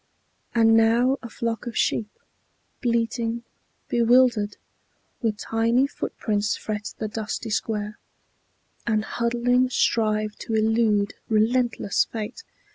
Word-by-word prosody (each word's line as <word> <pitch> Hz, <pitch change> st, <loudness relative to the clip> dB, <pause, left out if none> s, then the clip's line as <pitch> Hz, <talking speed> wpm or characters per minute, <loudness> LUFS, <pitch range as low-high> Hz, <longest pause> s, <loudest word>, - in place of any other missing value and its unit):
And 225 Hz, -1 st, +5 dB
now 235 Hz, +4 st, +4 dB
a 235 Hz, -, -8 dB
flock 230 Hz, +2 st, -3 dB
of 235 Hz, -, -5 dB
sheep, 215 Hz, -2 st, +1 dB, 0.7 s
bleating, 235 Hz, -1 st, 0 dB, 0.4 s
bewildered, 235 Hz, -3 st, +3 dB, 0.6 s
With 220 Hz, -3 st, 0 dB
tiny 230 Hz, +5 st, +2 dB
footprints 210 Hz, -6 st, -2 dB
fret 210 Hz, -1 st, -5 dB
the 215 Hz, -, -3 dB
dusty 220 Hz, +1 st, -4 dB
square, 210 Hz, -1 st, -2 dB, 0.9 s
And 215 Hz, -2 st, +1 dB
huddling 245 Hz, +2 st, +1 dB
strive 215 Hz, -3 st, +1 dB
to 225 Hz, -, -3 dB
elude 220 Hz, -2 st, +2 dB, 0.2 s
relentless 225 Hz, 0 st, +2 dB
fate. 225 Hz, -, -6 dB
225 Hz, 105 wpm, -24 LUFS, 215-235 Hz, 0.9 s, And